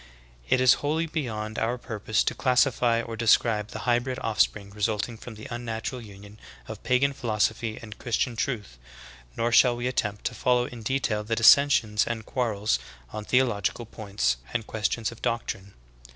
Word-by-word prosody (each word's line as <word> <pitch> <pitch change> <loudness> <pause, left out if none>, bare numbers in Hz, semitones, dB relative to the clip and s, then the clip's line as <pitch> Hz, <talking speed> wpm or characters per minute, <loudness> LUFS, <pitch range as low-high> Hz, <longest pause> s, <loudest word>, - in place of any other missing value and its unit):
14. - - +4
It - - +1
is 130 -1 +7
wholly 155 +3 0
beyond 110 -9 -4
our 115 +2 0
purpose 110 -2 -1
to - - 0
classify 125 -3 +2
or 115 -1 -6
de 115 +1 -4
scribe 105 -2 +4
the - - -7
hybrid 125 +1 +1
offspring 105 -2 +1
resulting 105 +2 -1
from 115 +1 -10
the 110 - -9
unnatural 120 +1 -4
union 100 -1 -13 0.3
of - - -8
pagan 135 +3 +2
philosophy 110 -2 -1
and 110 -2 -11
Christian 120 0 -1
truth; 105 - -3 0.6
nor 120 +1 +1
shall 120 +1 +6
we 120 +1 -4
attempt 105 -5 -1
to - - -1
follow 125 -1 +2
in 120 -2 -9
detail 110 -3 -1
the 115 +2 -1
dissensions 115 -3 +5
and 115 -2 -3
quarrels 105 - 0 0.3
on 105 - -5
theological 120 -2 +1
points 100 - -1 0.2
and 115 -3 -1
questions 110 +1 -1
of 115 - -13
doctrine. 100 -4 -3
115 Hz, 165 wpm, -26 LUFS, 105-125 Hz, 0.6 s, is